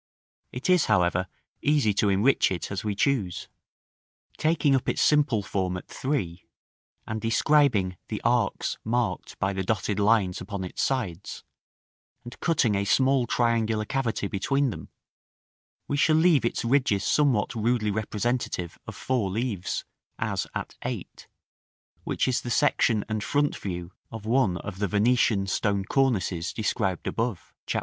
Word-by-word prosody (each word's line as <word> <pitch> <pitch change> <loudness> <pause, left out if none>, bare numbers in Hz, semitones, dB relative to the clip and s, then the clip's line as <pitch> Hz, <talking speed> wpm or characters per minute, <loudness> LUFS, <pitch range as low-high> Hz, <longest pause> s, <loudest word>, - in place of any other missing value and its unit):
It 125 - -5
is, 180 -3 +4
however, 90 +1 +2 0.3
easy 145 -8 +2
to 100 +1 +2
enrich 105 +8 +3
it 90 0 -4
as 100 - -3
we 105 -2 -2
choose: 105 -7 0 0.9
taking 155 -3 +2
up 130 - 0
its - - -1
simple 145 -8 +3
form 95 -2 -2
at - - -10
3, 95 - -3 0.6
and 110 0 -4
describing 115 -6 +2
the 105 - -4
arcs 120 -3 0
marked 120 0 -2
by 95 +1 0
the 95 - -2
dotted 105 0 -1
lines 100 -3 +2
upon 95 +1 -5
its 90 - -4
sides, 120 -11 -2 0.8
and 120 +1 -10
cutting 145 -10 +2
a 100 0 +1
small 130 +3 +3
triangular 115 -2 +1
cavity 125 -5 -1
between 135 +7 0
them, - - -9 1.0
we 145 - -1
shall 155 +2 +4
leave 160 -5 +4
its 115 - -1
ridges 120 -6 +2
somewhat 135 -9 +2
rudely 115 -1 0
representative 110 -3 -2
of - - -7
four 125 -7 -1
leaves, 105 -2 -2 0.3
as - - -2
at - - -4
8, - - -6 0.8
which - - 0
is 130 - +1
the 120 - -6
section 120 -5 +2
and 110 -1 -2
front 145 0 +1
view 90 -2 -5 0.2
of 110 -2 -8
one 110 -6 +2
of 95 +2 -7
the 100 - +1
Venetian 105 0 +2
stone 100 0 0
cornices 95 -10 0
described 100 -4 -1
above, 115 -6 -3
Chap. - - 0
110 Hz, 145 wpm, -26 LUFS, 100-130 Hz, 1.0 s, is